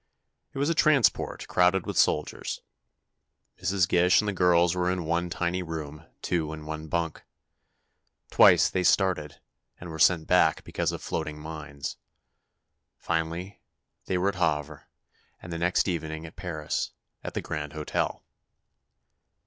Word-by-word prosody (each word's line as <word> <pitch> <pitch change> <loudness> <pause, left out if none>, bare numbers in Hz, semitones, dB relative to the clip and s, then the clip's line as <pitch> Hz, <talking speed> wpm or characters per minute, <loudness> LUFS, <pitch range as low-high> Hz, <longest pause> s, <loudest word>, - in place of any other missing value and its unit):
It - - -10
was 140 +1 +1
a - - +3
transport, 155 -6 +2
crowded 90 0 +3
with - - -4
soldiers. - - 0 1.0
Mrs. 95 -2 +2
Gish 90 +1 +4
and 105 - 0
the 105 - 0
girls 90 -2 +4
were 90 0 0
in 90 -2 -2
one 85 +2 0
tiny 90 +1 -1
room, 80 -2 -7 0.2
two 80 -3 -1
in 75 -1 -8
one 80 0 -6
bunk. 85 0 -2 1.1
Twice - - +7
they 95 - -1
started, 85 -6 +1 0.4
and 85 -1 -8
were 80 - -7
sent 80 -1 +4
back - - +3
because - - -2
of - - -7
floating 75 0 -3
mines. 75 -2 -7 1.0
Finally 85 +4 -3 0.4
they 95 - 0
were 95 +2 +2
at 100 - -5
Havre, 75 -2 -1 0.5
and 85 - -8
next 90 +3 +2
evening 80 -2 -3
at 80 - -11
Paris, 80 -4 -3 0.3
at - - -6
the - - -1
Grand 75 -1 -4
Hotel. 75 -1 -2
85 Hz, 140 wpm, -27 LUFS, 80-90 Hz, 1.1 s, Twice